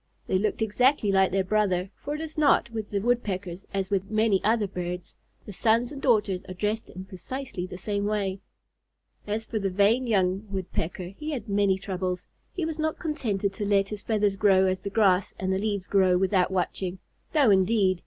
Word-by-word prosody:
They 185 - +1
looked 215 +2 0
exactly 225 +1 +2
like 190 -1 +3
their 190 +1 +1
brother, 190 -2 +1
for 290 +1 -5
it 305 - -5
is 315 -1 -6
not 295 -5 +3
with 220 -2 -5
the 200 -1 -1
Woodpeckers 195 -6 -2
as 195 0 -2
with 195 -1 0
many 215 -3 +2
other 220 0 +2
birds, 180 -2 -5 0.3
the 205 - -8
sons 230 +5 +2
and 280 -2 -7
daughters 210 -7 +2
are 185 - -8
dressed 210 +4 -2
in 185 +1 -8
precisely 190 0 -6
the 180 - -8
same 200 +2 -2
way. 200 -2 -1 0.9
As 215 +2 -2
for 220 -1 -3
the 195 -1 0
vain 205 +7 +3
young 195 -1 +1
Woodpecker, 185 -2 -4
he 305 +6 -6
had 255 -7 -4
many 200 -2 +2
troubles. 185 -2 -3 0.3
He 355 - -3
was 320 -1 -4
not 315 0 -1
contented 210 - -2
to 205 - -4
let 200 -1 +2
his 210 -1 -5
feathers 205 -3 +1
grow 195 -2 +4
as 185 0 0
the 200 - -5
grass 195 -3 +2
and 190 0 -1
the 190 - 0
leaves 205 -2 -2
grow, 185 -2 +3
without 190 0 +2
watching. 185 0 -2 0.4
No 275 -8 +5
indeed! 190 -1 +3
200 Hz, 195 wpm, -26 LUFS, 190-220 Hz, 0.9 s, No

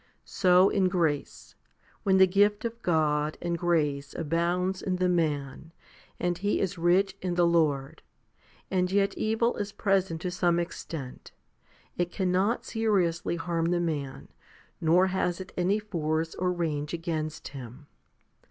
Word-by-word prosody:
So 180 +1 +4
in 190 -2 +2
grace, 160 -5 -2 0.5
when 190 -2 +3
the 190 - +8
gift 205 +3 +2
of 230 0 -5
God 155 -4 +1
and 170 0 -2
grace 150 -5 0
abounds 175 +4 -1
in 185 - -1
the 180 0 +1
man, 155 -3 -1 0.5
and 175 -1 -1
he 205 +2 0
is 190 -2 -1
rich 180 +3 +2
in 180 -2 -2
the 175 0 +4
Lord, 155 -5 +1 0.7
and 180 -1 +1
yet 200 0 +2
evil 225 +2 0
is 205 0 -3
present 190 -5 0
to 180 - -3
some 175 -1 +1
extent, 160 -5 -6 0.7
it 175 0 0
cannot 190 +4 0
seriously 185 -7 0
harm 170 -1 -2
the 175 +1 +1
man, 150 -6 -3 0.5
nor 170 +3 +4
has 185 -2 -1
it 185 - -8
any 185 +3 +1
force 165 -6 -2
or 180 0 -1
range 155 -3 -2
against 160 -2 -4
him. 130 +1 -10
175 Hz, 145 wpm, -28 LUFS, 160-190 Hz, 0.7 s, the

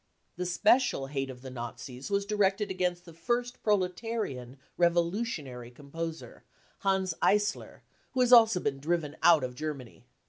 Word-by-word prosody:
53 180 - -8
The - - 0
special 210 - +3
hate 135 -1 -3
of 125 -1 -10
the 130 - -8
Nazis 125 +2 -7
was 200 0 0
directed 205 -1 +1
against 180 -1 -1
the 170 - -12
first 240 +8 -2
proletarian 185 - -2 0.2
revolutionary 170 - 0
composer, 160 +5 -7 0.4
Hans 190 -2 +1
Eisler, 205 0 +1 0.3
who 260 - +1
has 250 0 +4
also 225 -5 +7
been 135 -5 -2
driven 155 0 -1
out 165 -5 +6
of 125 -1 -3
Germany. 140 -4 -7
175 Hz, 145 wpm, -29 LUFS, 135-205 Hz, 0.4 s, also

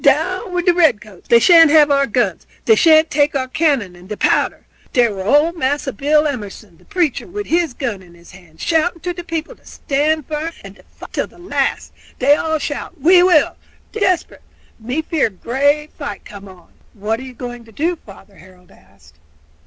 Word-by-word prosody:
Down 370 0 +1
wid 355 0 -2
de 355 - +4
redcoats! 215 - 0
dey 235 - +6
shan't 330 +6 +7
have 295 -1 +5
our 280 -1 +2
guns; 245 +2 -1 0.2
dey 445 - +6
shan't 320 -5 +4
take 290 +1 +2
de 265 -2 -2
cannon 260 - 0
and 180 +2 -16
de 210 - -5
powder.' - - 0 0.3
Dere 240 -4 +3
were 190 -1 -6
ole 295 - +3
Massa 290 -4 -2
Bill 300 +6 +2
Emerson, 210 - -6
the - - -24
preacher, 350 -8 -1
wid 415 +3 -6
his 330 -5 0
gun 235 -8 -4
in 175 -2 -18
his 170 0 -17
hands, 175 -4 -14
shouting 335 +1 0
to 355 +2 -3
de 350 0 -8
people 330 -1 -5
to - - -30
stand 300 +1 -1
firm 315 +2 -4
and - - -12
to - - -18
fight - - -14
till - - -2
de - - -21
last; 350 +1 -2 0.2
dey 275 +3 +4
all 315 +1 0
shout, 300 +3 -6
'We 355 +6 +5
will!' 350 -5 +3 0.3
Dey 445 - -6
bery 400 - +2
desperate; 360 -2 -3 0.4
me 250 +8 -3
fear 310 -6 0
great 285 +9 -1
fight 285 -2 -7
come 200 -1 -11
on." 185 -2 -17 0.2
"What 215 +2 -2
are - - -8
you 260 -1 -10
going 245 -1 -8
to 225 - -17
do, 330 +10 -1
father?" 200 - -17
Harold 180 0 -19
asked. 75 -6 -23
285 Hz, 205 wpm, -18 LUFS, 215-325 Hz, 0.4 s, shan't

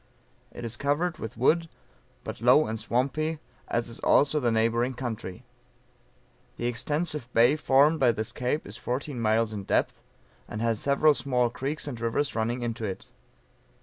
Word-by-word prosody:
It - - -7
is 115 +1 -4
covered 150 +6 0
with 110 - -6
wood 165 +7 +2 0.5
but - - -7
low 125 +6 +6
and 110 0 -4
swampy, 140 +8 -1 0.3
as 120 0 -1
is 115 - -7
also 145 +2 +3
the 125 -4 +1
neighboring 115 +3 +1
country. 115 -4 -5 1.1
The 120 - -3
extensive 145 +2 -2
bay 120 +5 +5
formed 150 +2 +4
by 125 -3 +5
this 110 -1 -4
cape 125 +5 -2
is 105 +3 -8
fourteen 125 +1 -3
miles 110 0 +2
in 100 -2 -5
depth, - - 0 0.5
and 105 - -6
has 115 -1 0
several 140 +2 +4
small 125 -3 0
creeks 145 +5 -3
and 120 -5 -6
rivers 115 +5 0
running 115 +2 -1
into 115 -1 -3
it. 95 -3 -5
125 Hz, 160 wpm, -27 LUFS, 115-145 Hz, 1.1 s, low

